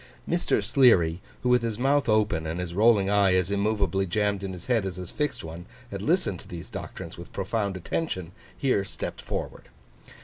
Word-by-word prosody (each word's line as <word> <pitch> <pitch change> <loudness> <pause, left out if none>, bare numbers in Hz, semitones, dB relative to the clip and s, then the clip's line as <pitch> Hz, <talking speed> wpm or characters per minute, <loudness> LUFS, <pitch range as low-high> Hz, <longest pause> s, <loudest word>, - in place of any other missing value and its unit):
Mr. 170 - +1
Sleary, 100 - +4 0.2
who 125 - +2
with 125 0 +5
his 115 -3 -2
mouth 135 +1 +2
open 105 -7 +2
and 80 +2 -3
his 90 -1 -4
rolling 105 0 +4
eye 100 -2 +4
as 90 +1 +1
immovably 100 -1 +1
jammed 100 +2 0
in 95 - -3
his 90 -2 -9
head 120 -4 +2
as 95 -2 -3
his 90 -2 -7
fixed 150 -1 -2
one, 85 +3 -8 0.2
had 100 -1 -4
listened 155 - +1
to - - -13
these 85 -1 -8
doctrines 85 0 -7
with 85 - -10
profound 100 0 -2
attention, 95 - -3 0.3
here 130 -8 +2
stepped 95 - -6
forward. - - -5
100 Hz, 190 wpm, -27 LUFS, 90-115 Hz, 0.3 s, with